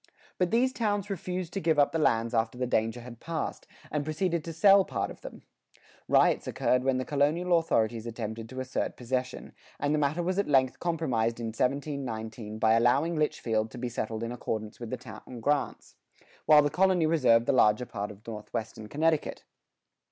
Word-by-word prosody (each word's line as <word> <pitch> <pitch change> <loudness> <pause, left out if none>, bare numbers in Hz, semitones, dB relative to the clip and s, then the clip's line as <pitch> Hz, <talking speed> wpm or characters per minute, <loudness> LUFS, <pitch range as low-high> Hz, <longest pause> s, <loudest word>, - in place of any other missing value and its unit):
But 180 -1 +2
these 255 +5 +2
towns 205 -4 -1
refused 180 -1 -4
to 195 - -1
give 160 -3 +1
up 145 -1 +4
the 165 - -1
lands 115 -5 +2
after 115 +1 0
the 125 - -1
danger 115 0 0
had 120 -1 -11
passed, 165 -1 -4 0.2
and 150 -1 -1
proceeded 165 +2 -1
to 165 - -4
sell 195 +4 +6
part 115 - -3
of - - -13
them.[76:2] - - -14 0.3
Riots - - +3
occurred 125 0 +1
when 135 -1 +1
the 130 - -2
colonial 155 +5 +2
authorities 115 -7 0
attempted 115 -1 -5
to 130 - -7
assert 130 0 -3
possession, 125 +1 -3 0.3
and 145 +1 0
the 155 - +2
matter 150 +4 0
was 185 +3 0
at 200 - 0
length 130 -3 +2
compromised 130 -10 -1
in 115 -1 -3
1719 120 -4 -3
by 110 0 +3
allowing 125 +9 +3
Litchfield 115 -8 0
to 125 - -11
be 125 0 -3
settled 110 -1 -4
in 115 - -3
accordance 110 -3 -4
with 120 -2 -6
the 130 - -3
town 120 0 -10
grants, 145 +4 -1 0.5
while 150 -1 +8
the 145 - 0
colony 185 -3 +3
reserved 130 -8 +4
the - - +2
larger 110 -1 +4
part 105 -3 -5
of 105 0 -13
northwestern 110 0 -6
Connecticut. 155 +5 0
130 Hz, 185 wpm, -28 LUFS, 115-160 Hz, 0.5 s, while